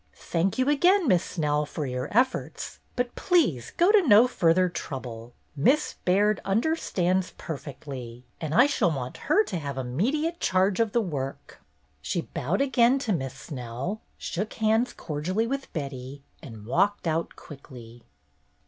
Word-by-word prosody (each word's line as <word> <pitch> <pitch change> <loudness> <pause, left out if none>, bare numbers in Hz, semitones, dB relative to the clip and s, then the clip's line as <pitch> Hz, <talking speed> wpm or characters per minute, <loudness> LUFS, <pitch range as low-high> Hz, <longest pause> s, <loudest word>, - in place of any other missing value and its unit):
Thank 180 +3 -1
you 255 +1 +1
again. 350 +5 +4
Miss 180 -6 +4
Snell, 150 -3 0
for 150 0 -4
your 125 +1 -3
efforts, 250 +4 -1 0.2
but 245 -1 -1
please 210 - +1
go 350 +4 +5
to 425 -2 +6
no 240 - +6
further 180 -5 +3
trouble. 125 -8 -6 0.2
Miss 270 - +2
Baird 205 +3 +3
under 230 +12 +1
stands 185 - 0
perfectly, 130 -5 -7 0.2
and 155 -2 -3
I 245 - +7
shall 285 -10 +2
want 130 -5 -4
her 400 +8 +5
to 185 - -4
have 140 -3 -5
immediate 255 - -1
charge 190 +2 +2
of 225 -3 +1
the 235 - +3
work." 140 -9 -5 0.4
She 125 - -2
bowed 165 - -2
again 260 -2 +4
to 235 -6 -1
Miss 135 -6 -3
Snell, 130 - -5 0.2
shook 205 +5 -4
hands 220 +2 +2
cordially 180 +8 -2
with 275 +3 -4
Betty, 140 -2 -6 0.2
and 110 -9 -10
walked 200 - +1
out 165 0 -1
quickly. 120 -5 -12
180 Hz, 150 wpm, -26 LUFS, -, 0.4 s, I